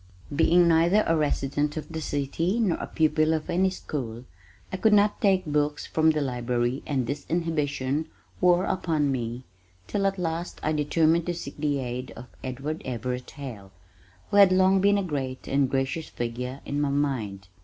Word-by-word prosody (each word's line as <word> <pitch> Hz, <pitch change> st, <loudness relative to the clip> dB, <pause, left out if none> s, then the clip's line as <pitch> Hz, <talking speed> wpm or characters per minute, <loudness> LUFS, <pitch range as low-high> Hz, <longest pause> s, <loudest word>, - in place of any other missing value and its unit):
Being 170 Hz, +3 st, +5 dB
neither 170 Hz, +6 st, +4 dB
a 165 Hz, -, +2 dB
resident 145 Hz, 0 st, 0 dB
of 155 Hz, -, -5 dB
the 160 Hz, -1 st, -5 dB
city 165 Hz, -, -1 dB
nor 205 Hz, -7 st, +2 dB
a -, -, -4 dB
pupil 155 Hz, 0 st, +2 dB
of 155 Hz, -, -4 dB
any 190 Hz, +2 st, +3 dB
school 125 Hz, -10 st, -5 dB, 0.5 s
I -, -, -1 dB
could 215 Hz, +2 st, +3 dB
not 205 Hz, 0 st, +3 dB
take 190 Hz, -2 st, +3 dB
books 150 Hz, -1 st, 0 dB
from 160 Hz, 0 st, +2 dB
the 155 Hz, -1 st, +1 dB
library 125 Hz, 0 st, -1 dB
and 135 Hz, -4 st, 0 dB
this 140 Hz, +5 st, -4 dB
inhibition 155 Hz, -3 st, -1 dB, 0.3 s
wore 180 Hz, 0 st, +4 dB
upon 155 Hz, -6 st, 0 dB
me 120 Hz, -1 st, -3 dB, 0.4 s
till 195 Hz, -1 st, 0 dB
at 195 Hz, 0 st, -1 dB
last 170 Hz, 0 st, -3 dB
I 155 Hz, -, +1 dB
determined 160 Hz, +2 st, +2 dB
to 175 Hz, -, -1 dB
seek 140 Hz, -4 st, -7 dB
the 145 Hz, -1 st, 0 dB
aid 125 Hz, -1 st, -4 dB
of 120 Hz, -, -9 dB, 0.2 s
Edward 135 Hz, +5 st, -4 dB
Everett 125 Hz, 0 st, -4 dB
Hale 115 Hz, -9 st, -9 dB, 0.6 s
who 205 Hz, -, +2 dB
had 200 Hz, -2 st, +8 dB
long 190 Hz, +1 st, +4 dB
been 200 Hz, +1 st, +4 dB
a 200 Hz, -, 0 dB
great 135 Hz, -6 st, -4 dB
and 135 Hz, -1 st, +2 dB
gracious 135 Hz, +4 st, -2 dB
figure 125 Hz, +3 st, -4 dB
in 145 Hz, +1 st, -2 dB
my 145 Hz, -, +1 dB
mind. 120 Hz, -10 st, -2 dB
150 Hz, 175 wpm, -26 LUFS, 130-170 Hz, 0.6 s, had